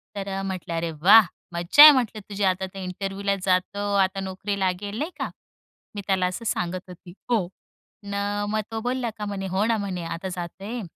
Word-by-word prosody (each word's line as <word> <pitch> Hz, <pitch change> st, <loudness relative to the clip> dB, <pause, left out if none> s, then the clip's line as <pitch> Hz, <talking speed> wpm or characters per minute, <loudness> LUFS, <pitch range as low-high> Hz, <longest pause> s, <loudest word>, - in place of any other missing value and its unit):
तर 195 Hz, -1 st, -3 dB
म्हटलं, 185 Hz, -3 st, -4 dB
अरे 165 Hz, 0 st, -2 dB
वाह! 210 Hz, +5 st, +8 dB, 0.3 s
मज्जा 175 Hz, +12 st, +7 dB
आहे 305 Hz, -, +13 dB
म्हटलं 230 Hz, -5 st, 0 dB
तुझी 200 Hz, 0 st, -3 dB
आता 190 Hz, 0 st, +1 dB
तर 195 Hz, -, -8 dB
इंटरव्ह्युला 195 Hz, +2 st, -2 dB
जातो, 200 Hz, +2 st, 0 dB
आता 195 Hz, 0 st, +2 dB
नोकरी 195 Hz, +1 st, -4 dB
लागेल, 195 Hz, +3 st, -2 dB
नाही 320 Hz, +5 st, -2 dB
का? -, -, -2 dB, 0.7 s
मी 205 Hz, -, -4 dB
त्याला 190 Hz, -2 st, +2 dB
असं 185 Hz, +6 st, -4 dB
सांगत 180 Hz, -3 st, -2 dB
होती 175 Hz, 0 st, -12 dB, 0.2 s
हो 220 Hz, -8 st, +1 dB, 0.6 s
न, 200 Hz, -, -5 dB, 0.3 s
मग 215 Hz, 0 st, 0 dB
तो 225 Hz, -, -3 dB
बोलला 245 Hz, 0 st, -1 dB
का 210 Hz, -, -4 dB
म्हणे 195 Hz, -2 st, -4 dB
हो 190 Hz, +3 st, 0 dB
ना 225 Hz, -1 st, +2 dB
म्हणे 190 Hz, -4 st, -4 dB
"आता 165 Hz, +3 st, -5 dB
जातोय, 190 Hz, +6 st, -6 dB
195 Hz, 185 wpm, -24 LUFS, 185-210 Hz, 0.7 s, आहे